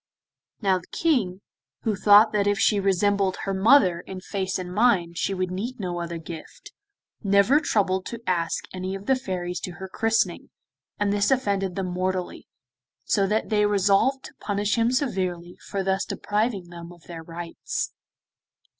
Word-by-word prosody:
Now 190 -2 +3
the 180 - -18
King, 215 - 0 0.4
who 220 -2 0
thought 210 +3 +6
that 205 -1 +2
if 205 0 +2
she 210 -1 +3
resembled 195 0 +2
her 195 - -2
mother 190 -3 +5
in 185 +1 -8
face 190 0 -3
and 180 -1 -6
mind 185 -7 +2
she - - 0
would 185 -1 -2
need 225 +7 -4
no 175 -3 -3
other 170 0 -4
gift, 165 0 -10 0.5
never 200 +7 +4
troubled 190 -9 0
to 235 - -6
ask 170 -2 0
any 185 +1 -4
of 195 +1 -8
the 265 - +3
Fairies 180 -8 -4
to 180 - -6
her 190 +1 -8
christening, 225 +3 0 0.5
and 205 -1 +1
this 205 -1 +2
offended 200 -8 0
them 185 -2 -2
mortally, 185 0 -3 0.6
so 195 -1 +2
that 215 +2 0
they 210 -1 +3
resolved 205 +7 +2
to - - -10
punish 205 0 0
him 230 0 +2
severely 185 -10 -2
for 200 -1 -2
thus 190 +1 0
depriving 205 -4 -2
them 170 0 -9
of 175 -1 -16
their 170 -2 -8
rights. 165 +1 -5
195 Hz, 165 wpm, -25 LUFS, 180-210 Hz, 0.6 s, thought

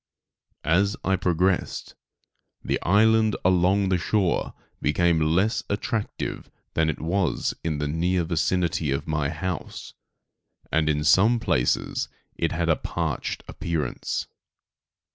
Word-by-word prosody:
As 100 +6 +2
I 95 - +2
progressed, 90 0 0 0.7
the - - -1
island 110 +3 +4
along 95 +2 +3
the 95 -1 +2
shore 95 +1 0 0.3
became 85 +1 +2
less 105 +6 +2
attractive 105 +1 -3 0.2
than 80 0 +2
it 80 - -3
was 85 -2 0
in 80 -2 -1
the 75 0 -1
near 85 +4 +1
vicinity 85 -1 0
of 70 +1 -1
my 75 -2 0
house; 85 +2 -5 0.8
and 75 -1 +2
in 75 0 +1
some 100 +10 +5
places 65 - 0 0.3
it - - -1
had 85 0 -1
a 80 - +4
parched - - -3
appearance. 80 -3 -3
85 Hz, 120 wpm, -25 LUFS, 80-95 Hz, 0.8 s, some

